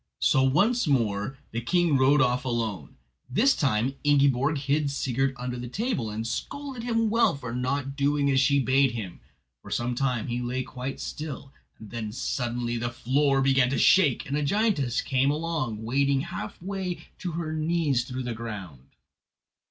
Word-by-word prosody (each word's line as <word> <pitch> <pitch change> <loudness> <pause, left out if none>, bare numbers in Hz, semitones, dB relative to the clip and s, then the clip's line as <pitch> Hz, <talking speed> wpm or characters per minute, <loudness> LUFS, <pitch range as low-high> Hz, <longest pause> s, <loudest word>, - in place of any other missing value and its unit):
So 130 - +3
once 190 - +3
more 115 -2 0
the 115 - -3
king 170 +4 +2
rode 135 +2 +4
off 125 0 +2
alone. 110 - -3 0.3
This 240 - +3
time 130 -2 +1
Ingiborg 140 0 +3
hid 145 +1 0
Sigurd 135 -1 -1
under 125 0 -4
the 125 - -5
table, 180 - -2
and 110 +2 -4
scolded 275 - -5
him 230 -2 0
well 230 -6 +3
for 125 -4 -6
not 135 +2 -2
doing 140 0 +1
as 135 - +3
she 140 +1 +3
bade 135 -1 +3
him. 100 -7 -6 0.4
For - - -12
some 120 +1 -1
time 125 -3 -1
he 120 +1 -2
lay 125 +1 -2
quite 130 +1 -6
still, 145 -3 -6 0.2
and 110 -2 -12
then 110 -3 -4
suddenly 120 -1 -2
the 120 +1 -2
floor 135 +3 +1
began 135 -2 +3
to 140 - -1
shake, 155 -10 +4
and 140 - -3
a 150 - 0
giantess 145 - +1
came 135 0 +2
along 150 -8 -2
wading 135 +3 +1
half 170 +4 -6
way 190 -1 -4 0.2
to 175 -3 -4
her 160 -1 -3
knees 155 -5 +1
through 130 +1 -5
the 120 -1 -3
ground. 95 - -8
135 Hz, 170 wpm, -26 LUFS, 120-150 Hz, 0.4 s, rode